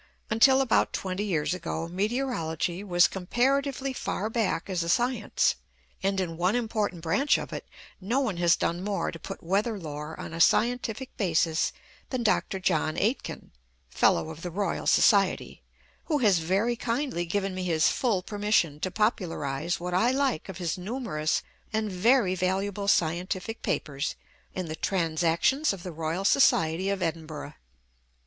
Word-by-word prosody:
Until 265 +5 +6
about 260 -4 +2
twenty 190 +1 -2
years 170 -4 0
ago, 165 -2 -4
Meteorology 185 - -2
was 175 -3 +4
comparatively 270 +7 0
far 215 -3 -3
back 220 -7 0
as 185 -3 -1
a 170 - -3
science; 245 - +1 0.4
and 195 0 0
in 165 -3 -3
one 180 +6 +2
important 215 -7 -1
branch 270 - +2
of - - -6
it, - - -6 0.3
no 220 +8 0
one 215 -10 -1
has 175 -1 +4
done 175 +2 -2
more 205 0 -1
to 165 - -9
put - - -8
weather 205 +6 0
lore 150 -2 -7
on - - -7
a 165 - -2
scientific 245 +4 +2
basis 165 -4 +1 0.4
than 255 -3 -2
Dr. 195 -2 +1
John 160 -4 0
Aitken, 225 +7 -2 0.4
F.R.S., 165 - +1 1.1
who 305 - +1
has 205 -10 +4
very 195 +9 +1
kindly 235 -5 -2
given 195 +2 -1
me 185 0 -4
his 160 -3 +3
full 220 -8 0
permission 205 -7 +1
to 185 - -1
popularise 175 - -1
what 180 +1 -4
I 220 +7 +3
like 260 - 0
of 190 - -6
his 175 -1 -2
numerous 190 -7 -2 0.3
and 215 -2 -1
very 200 +1 +3
valuable 195 +2 -1
scientific 185 +5 0
papers 140 +1 -2 0.4
in 185 - -2
the 155 -1 -5
Transactions 170 - +1
of 185 -3 -9
the 180 - -5
Royal 165 +4 -3
Society 185 -6 +3
of 195 -2 -1
Edinburgh. 155 -3 -4
190 Hz, 145 wpm, -27 LUFS, 165-225 Hz, 1.1 s, Until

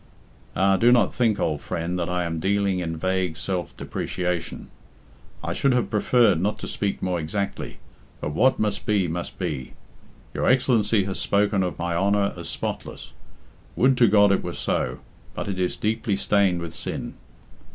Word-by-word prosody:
"Ah! 95 +1 +3
do 120 +5 +5
not 120 -1 +4
think, 115 -4 +1
old 75 -3 -1
friend, 90 +2 -3
that 85 0 -2
I 90 0 0
am 80 -1 -3
dealing 100 +1 +1
in 80 -2 -3
vague 95 -1 -1
self 90 0 -3
depreciation. 90 -2 -3 0.7
I - - -2
should 135 -2 +2
have 125 -1 0
preferred 105 -4 +3
not 105 +3 0
to - - -6
speak 100 -1 -2
more 90 -2 0
exactly, 100 +6 -3 0.4
but 75 - -3
what 130 - +3
must 105 +1 -2
be, 100 -4 +2
must 85 +2 -4
be. 65 -4 -4 0.6
Your - - -1
Excellency 115 -5 +3
has 95 0 -3
spoken 100 0 +2
of 90 -2 -2
my 85 0 -2
honour 100 +2 +2
as 85 -1 -6
spotless. - - -5 0.6
Would 130 +1 +4
to 120 - +7
God 100 0 +5
it 100 - +1
were - - -4
so; 65 0 -1 0.4
but - - -4
it 95 -2 -3
is 90 -1 0
deeply 110 -1 0
stained 100 -3 +2
with 85 -1 -6
sin." 75 - -4
95 Hz, 170 wpm, -24 LUFS, 85-105 Hz, 0.7 s, to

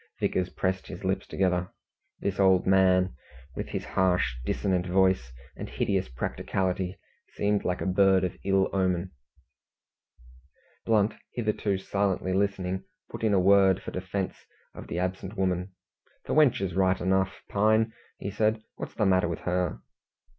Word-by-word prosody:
Vickers 90 -1 0
pressed 95 0 -2
his 90 -1 -8
lips 95 0 -1
together. 90 -1 0 0.5
This 100 -1 -2
old 95 -2 +4
man, 95 -1 +4 0.4
with - - -4
his - - -4
harsh, 90 -8 +1
dissonant 90 +6 0
voice, 95 -9 +2 0.2
and - - -7
hideous 80 +6 -1
practicality, 90 +8 -2 0.4
seemed 105 0 +1
like 90 0 -1
a - - -2
bird 95 0 +4
of 90 - -2
ill 95 -1 +3
omen. 95 -1 0 1.8
Blunt, 110 -1 +3 0.2
hitherto 105 -4 0
silently 95 -1 -1
listening, 95 -1 -1 0.3
put - - -7
in 105 -2 +3
a - - +4
word 95 0 +5
for - - -6
defence 95 +1 -4 0.3
of - - -10
the - - -4
absent 95 +3 -3
woman. 95 0 -1 0.5
"The - - -2
wench 150 -9 +4
is 95 -3 -2
right 95 0 +2
enough, 95 +1 0
Pine," 110 +2 +2 0.4
said 110 +2 +1
he. 110 - -26
"What's - - -7
the 105 - +1
matter 95 -2 +3
with 85 -1 -4
her?" 90 -1 -1
95 Hz, 145 wpm, -27 LUFS, 90-100 Hz, 1.8 s, word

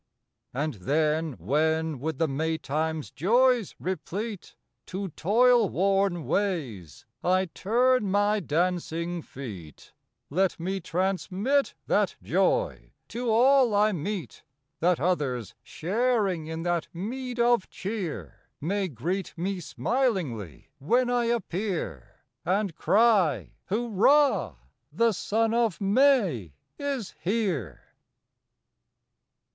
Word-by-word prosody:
And 145 +4 -2
then 155 - 0
when 155 - 0
with 160 +4 -3
the 165 - +1
May 160 +3 -1
time 160 +2 -2
s - - -13
joys 240 - +2
replete 190 +3 -5 0.3
To 190 +1 -4
toil 230 +6 +3
worn 195 -3 +1
ways 145 - -2 0.2
I 185 +1 +3
turn 245 +1 +2
my 205 +2 +2
dancing 170 0 -1
feet, 100 - -10 0.4
Let 185 +4 +1
me 190 +3 -2
transmit 195 - 0
that - - +1
joy - - 0 0.2
to 240 0 -3
all 250 0 +5
I 210 +1 +4
meet, 175 -7 -4
May 200 +2 -2
First - - -17 0.4
That 175 +2 +2
others 145 - -1
sharing 200 -3 0
in 160 +1 -4
that 175 -2 0
meed 245 +6 -5
of 235 -4 +3
cheer 175 - -6
May 195 +5 -1
greet 175 - -4
me 185 +3 -2
smilingly 145 - -2
when 245 - +2
I 245 -1 +2
appear, 190 - -3 0.2
And 190 +1 0
cry, 205 - +3
"Hurrah! 240 +7 +2 0.4
The 230 0 +3
Son 220 +3 0
of 230 -5 +1
May 195 - +2 0.2
is 275 -8 -3
here!" 175 - -1
185 Hz, 110 wpm, -27 LUFS, 160-225 Hz, 0.4 s, all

